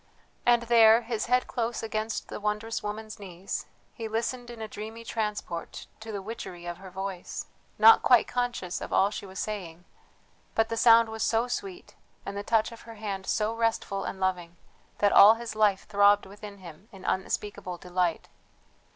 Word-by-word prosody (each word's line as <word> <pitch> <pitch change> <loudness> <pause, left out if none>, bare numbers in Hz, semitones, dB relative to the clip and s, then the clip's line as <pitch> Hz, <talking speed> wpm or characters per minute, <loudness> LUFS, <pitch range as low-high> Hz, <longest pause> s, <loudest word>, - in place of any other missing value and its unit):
And 240 -1 +5
there, 230 -1 +6
his 225 -1 -3
head 250 +1 +3
close 235 -1 -3
against 220 0 -3
the - - -6
wondrous 210 +2 -2
woman's 215 +1 -6
knees, 190 -1 -6 0.3
he 225 -2 -5
listened 240 +2 -3
in 240 -1 -9
a 220 - -5
dreamy 220 +2 -8
transport 210 -7 -4
to 220 0 -8
the 200 -2 -5
witchery 190 -5 -7
of 175 -1 -5
her 190 0 -11
voice 190 0 -5 0.3
not 220 +1 +8
quite 245 -2 +5
conscious 245 -8 -2
of - - -6
all 200 +1 +3
she 205 - -6
was 190 0 -11
saying, 180 -5 -5 0.7
but 225 0 +2
the 230 - -2
sound 230 0 +6
was 220 0 -6
so 230 +2 +2
sweet, 370 +8 -6 0.3
and - - -5
the 200 - -3
touch 220 +2 +1
of 230 - -11
her 230 -1 -11
hand 200 -3 -5
so 215 +1 0
restful 225 -3 -1
and 190 - -5
loving, 175 -2 -2 0.4
that 205 -1 +3
all 210 +3 +9
his 230 -1 -6
life 210 -3 +2
throbbed 205 0 +4
within 205 +1 -10
him 180 +2 -13
in 195 -3 -12
unspeakable 190 -1 -2
delight. 180 -1 -1
215 Hz, 175 wpm, -28 LUFS, 195-230 Hz, 0.7 s, all